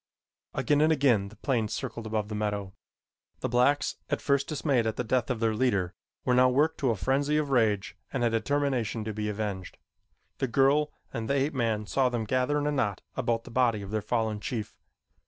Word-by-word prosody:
Again 145 0 +2
and 155 +1 +4
again 130 -10 +3
the 110 - -15
plane 120 -6 0
circled 110 +1 -5
above 110 -1 -1
the 110 - -6
meadow. 105 -2 -2 0.7
The - - 0
blacks, 125 +4 +2
at - - 0
first 140 -1 +1
dismayed 140 -6 +1
at 110 - -1
the - - -2
death 125 +1 0
of 125 -3 -1
their 115 -1 +2
leader, 100 -6 +1 0.3
were 125 - +3
now 125 +1 +6
worked 145 +5 +2
to 135 - +1
a 115 - +2
frenzy 140 +7 +1
of 150 -2 -1
rage 105 -6 +2 0.2
and 130 - -1
a 120 - +4
determination 120 -2 0
to 110 0 -4
be 105 0 -2
avenged. 100 -3 -4 0.6
The 135 - +1
girl 140 +4 +3 0.2
and 110 -1 -4
the 140 - +2
ape 140 +3 +1
man 115 -5 0
saw 130 +4 +2
them 120 -2 -2
gather 130 +6 +1
in 145 - -1
a 150 - +1
knot 115 -9 -1
about 115 -3 0
the 125 - -11
body 115 -4 +2
of 100 - -8
their 110 0 0
fallen 110 -2 -1
chief. 110 -4 -4
120 Hz, 210 wpm, -28 LUFS, 110-135 Hz, 0.7 s, now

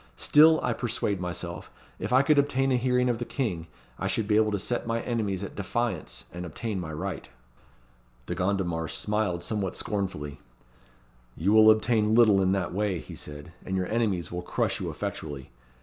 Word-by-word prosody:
Still 155 - +6
I - - +1
persuade 105 -5 -1
myself, 90 -2 -5 0.3
if - - -4
I 130 +2 +5
could 150 +1 +4
obtain 135 -1 +1
a - - +4
hearing 125 0 +2
of 120 -2 0
the - - -2
King, 100 - -3 0.3
I - - -1
should 110 - -1
be 105 - +3
able 110 0 +4
to 100 - 0
set 115 +5 -2
my 115 0 0
enemies 105 -5 -2
at 100 - -6
defiance 100 -3 -3
and 90 +1 -5
obtain 95 +5 -4
my 85 -3 -5
right." 90 +2 -5 1.0
De - - -3
Gondomar 90 -4 -1
smiled 105 -4 -1
somewhat 100 -4 -2
scornfully. 90 -9 -3 1.0
"You 95 +6 +1
will 110 0 +8
obtain 110 0 +3
little 110 -5 +6
in 95 0 +2
that 95 -3 -1
way," 100 -1 0
he - - -9
said, 75 +2 -8
"and 95 - -2
your 95 - 0
enemies 105 -8 0
will 90 0 -3
crush - - -1
you - - -2
effectually. 70 -5 -5
100 Hz, 180 wpm, -27 LUFS, 90-115 Hz, 1.0 s, will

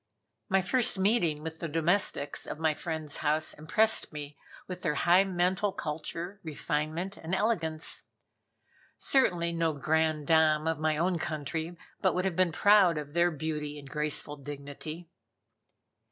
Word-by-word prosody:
My 190 0 +3
first 245 +1 +1
meeting 190 -7 +1
with 160 0 -6
the 165 - -3
domestics 165 -2 0
of - - -5
my 160 -1 +1
friend's 155 -2 -4
house 155 +1 0
impressed 215 +9 +4
me 150 -1 -7 0.3
with 180 -1 -6
their 150 -4 0
high 180 +2 +4
mental 185 +2 0
culture, 165 +5 -5
refinement 155 +4 -3
and 165 +4 -3
elegance. 170 -7 0 0.9
Certainly 175 -11 +1
no 165 -1 0
"grande 155 +1 0
dame" 155 0 +3
of 160 -2 -1
my 155 -1 +1
own 175 +1 0
country 160 +2 -4 0.2
but 190 - +2
would 180 +1 0
have 190 -3 -1
been 185 -1 +2
proud 195 -2 +5
of 145 -1 -6
their 170 +1 +3
beauty 150 -1 -4
and 140 -1 -11
graceful 150 0 -1
dignity. 145 +4 -7
160 Hz, 145 wpm, -29 LUFS, 150-180 Hz, 0.9 s, proud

